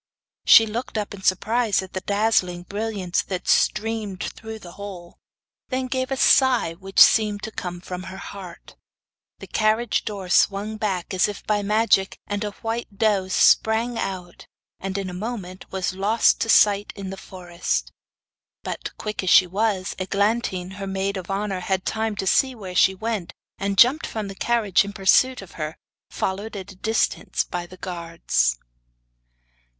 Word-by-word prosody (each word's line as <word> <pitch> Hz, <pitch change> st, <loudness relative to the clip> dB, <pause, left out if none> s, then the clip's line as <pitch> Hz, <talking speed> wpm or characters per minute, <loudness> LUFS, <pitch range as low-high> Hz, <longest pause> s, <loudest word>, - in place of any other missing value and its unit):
She 225 Hz, -, +8 dB
looked 225 Hz, +2 st, -4 dB
up 210 Hz, -1 st, -3 dB
in 200 Hz, -, -9 dB
surprise 210 Hz, +3 st, +1 dB
at 190 Hz, -, -12 dB
the 185 Hz, -, -3 dB
dazzling 200 Hz, -4 st, +1 dB
brilliance 200 Hz, -2 st, -2 dB
that 185 Hz, -2 st, -5 dB
streamed 215 Hz, -3 st, +1 dB
through 220 Hz, 0 st, -7 dB
the 180 Hz, -5 st, -12 dB
hole; 185 Hz, -3 st, -10 dB, 0.5 s
then 260 Hz, 0 st, -1 dB
gave 260 Hz, 0 st, -2 dB
a 270 Hz, -, -2 dB
sigh 255 Hz, -11 st, +4 dB
which 195 Hz, +3 st, -3 dB
seemed 210 Hz, -2 st, +6 dB
to 220 Hz, -, -5 dB
come 180 Hz, -4 st, -5 dB
from 180 Hz, 0 st, -6 dB
her 190 Hz, -, -8 dB
heart. 190 Hz, -2 st, -10 dB, 0.6 s
The -, -, -10 dB
carriage 215 Hz, +1 st, +1 dB
door 200 Hz, -4 st, -5 dB
swung 205 Hz, +4 st, +2 dB
back, 195 Hz, -4 st, -2 dB
as 185 Hz, -, +3 dB
if 205 Hz, -, -7 dB
by 210 Hz, -1 st, +1 dB
magic, 210 Hz, -1 st, +2 dB
and 205 Hz, 0 st, -3 dB
a 210 Hz, -, -2 dB
white 225 Hz, -2 st, -4 dB
doe 205 Hz, -3 st, +2 dB
sprang 220 Hz, +5 st, +3 dB
out, 180 Hz, -2 st, -5 dB, 0.3 s
and 195 Hz, 0 st, -4 dB
in 195 Hz, -1 st, -3 dB
a 180 Hz, -, -6 dB
moment 190 Hz, -2 st, -6 dB
was 190 Hz, -1 st, -2 dB
lost 205 Hz, +4 st, +2 dB
to 225 Hz, -, 0 dB
sight 205 Hz, -2 st, +4 dB
in 195 Hz, -2 st, -6 dB
the -, -, -5 dB
forest. 175 Hz, -, -4 dB, 0.7 s
But, -, -, -6 dB
quick 210 Hz, 0 st, -4 dB
as 185 Hz, -, -1 dB
she 185 Hz, -, +7 dB
was, 195 Hz, 0 st, -1 dB
Eglantine, 190 Hz, -1 st, -1 dB
her 195 Hz, -1 st, -5 dB
maid 195 Hz, +1 st, -2 dB
of 185 Hz, -1 st, -6 dB
honour, 195 Hz, -1 st, -2 dB
had 185 Hz, +1 st, -2 dB
time 220 Hz, -1 st, -1 dB
to 195 Hz, -, -3 dB
see 260 Hz, +7 st, +3 dB
where 190 Hz, -5 st, -8 dB
she 190 Hz, +1 st, +4 dB
went, 215 Hz, -3 st, -3 dB, 0.3 s
and 195 Hz, 0 st, -2 dB
jumped 265 Hz, +9 st, +5 dB
from 215 Hz, -3 st, -4 dB
the -, -, -6 dB
carriage 220 Hz, -2 st, +2 dB
in 200 Hz, 0 st, -7 dB
pursuit 210 Hz, +5 st, +3 dB
of 190 Hz, -, -14 dB
her, 155 Hz, +1 st, -4 dB, 0.3 s
followed 200 Hz, +4 st, -3 dB
at 195 Hz, 0 st, -7 dB
a -, -, -14 dB
distance 220 Hz, +4 st, 0 dB
by 175 Hz, -1 st, -5 dB
the 185 Hz, -, -13 dB
guards. 170 Hz, -, -1 dB
200 Hz, 170 wpm, -23 LUFS, 185-220 Hz, 0.7 s, She